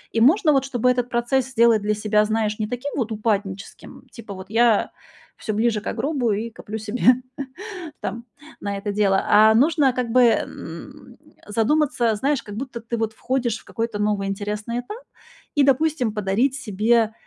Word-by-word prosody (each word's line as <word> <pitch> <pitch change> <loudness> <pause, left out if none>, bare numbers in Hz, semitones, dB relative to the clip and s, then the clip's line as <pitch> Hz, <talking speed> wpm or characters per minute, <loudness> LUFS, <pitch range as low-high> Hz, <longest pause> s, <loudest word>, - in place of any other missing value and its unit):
И - - +3
можно, 305 - +5
вот, 270 -1 +2
чтобы 250 -2 +1
этот 245 -1 0
процесс 245 +2 0
сделать 230 -3 +4
для 210 +1 +1
себя, 210 0 +2
знаешь, 215 -1 -1
не 215 - -1
таким 250 +4 -5
вот 230 -3 -1
упадническим, 205 -3 -3
типа, 220 -4 -9
вот 190 0 -10
я 225 -1 +3 0.6
всё 215 - -1
ближе 220 -1 +1
ко - - -4
гробу 250 -1 -1
и 220 +3 -2
коплю 220 0 -7
себе 220 +3 -5 1.0
там 230 +4 -5 0.4
на 200 0 -3
это 205 +1 -4
дело. 200 -2 +2
А 215 +1 +6
нужно 280 +1 +3
как 250 -1 -2
бы, 255 - +4
м, 235 -2 -2 0.3
задуматься, 235 +1 +1
знаешь, 275 +2 0
как 205 -1 -9
будто 245 -1 -6
ты 235 +1 -4
вот 225 -1 -2
входишь 240 -1 -1
в - - -19
какой-то 230 -2 -4
новый 205 -1 0
интересный 210 +4 -3
этап 245 - -8 0.6
и, 290 - +4
допустим, 275 -4 +2
подарить 215 +6 +1
себе, 225 -1 +1
225 Hz, 170 wpm, -22 LUFS, 210-250 Hz, 1.0 s, А